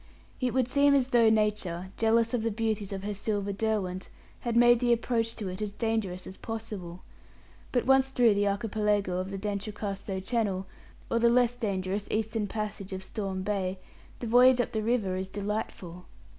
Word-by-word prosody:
It 255 -2 0
would 255 -2 +2
seem 280 +2 +4
as 265 -2 +2
though 235 -3 +5
nature, 210 -5 0
jealous 225 +1 +2
of 245 - +1
the 230 - 0
beauties 215 -2 -2
of 195 -1 -5
her 210 +1 -2
silver 205 0 -2
Derwent, 195 -3 -2 0.3
had 235 -1 -2
made 240 0 +6
the 245 -1 +2
approach 230 -1 0
to 210 - -5
it 185 +2 -5
as 210 -1 -3
dangerous 215 -5 -2
as 190 - -8
possible; 210 -6 -6 0.7
but 245 - +1
once 265 0 +4
through 245 -4 +4
the 205 0 +1
archipelago 205 -2 0
of 195 +1 -4
D'Entrecasteaux 200 -1 -4
Channel, 195 -3 -1 0.5
or 230 - +2
the 235 0 +5
less 245 0 +3
dangerous 200 -3 -2
eastern 220 -1 -1
passage 205 -2 -4
of 190 0 -5
Storm 190 -1 -4
Bay, 190 -2 -1 0.4
the - - -6
voyage 250 +2 +6
up 245 - 0
the 220 - -1
river 215 -5 0
is 190 0 -3
delightful. 195 -3 -5
210 Hz, 175 wpm, -29 LUFS, 195-230 Hz, 0.7 s, made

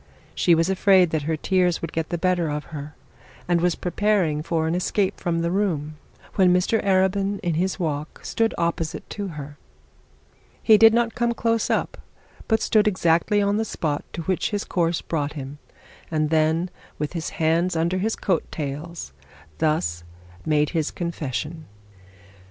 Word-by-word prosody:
She 175 - +4
was 165 +1 +2
afraid 190 -2 +4
that 155 - 0
her 160 - 0
tears 180 +1 +1
would 165 - -4
get 160 -1 -2
the 175 - -1
better 175 -1 +1
of 150 0 -3
her, 145 0 -7 0.5
and 175 -1 +2
was 175 -1 +2
preparing 180 -4 +1
for 160 0 -1
an 160 - 0
escape 185 +2 0
from 170 -2 -1
the 170 0 0
room, 165 -6 -1 0.4
when 185 -2 +4
Mr 180 +5 +2
Arabin 195 +1 +2
in 175 -3 -1
his 185 +4 -1
walk 150 -3 -3
stood 225 -1 0
opposite 170 -1 -2
to 205 -1 -4
her. 145 0 -8 1.0
He 220 - +7
did 225 +1 +8
not 235 -1 +1
come 235 -1 0
close 230 -1 0
up, - - -1 0.5
but 220 -1 +2
stood 215 -1 +3
exactly 185 +1 +2
on 200 +1 +1
the 220 - +1
spot 155 -8 -2
to 170 - -4
which 185 +6 0
his 205 -2 -2
course 170 -2 0
brought 150 -3 -2
him, 140 0 -7 0.5
and 155 -1 0
then, 160 +3 +2 0.3
with 150 +1 -3
his 165 -3 -3
hands 165 +3 +2
under 170 +3 0
his 220 +4 0
coat 180 -5 -1
tails, 150 - -5 0.5
thus 85 - 0 0.4
made 150 +1 +1
a 160 - +2
confession. 160 -1 -4
170 Hz, 165 wpm, -24 LUFS, 155-190 Hz, 1.0 s, did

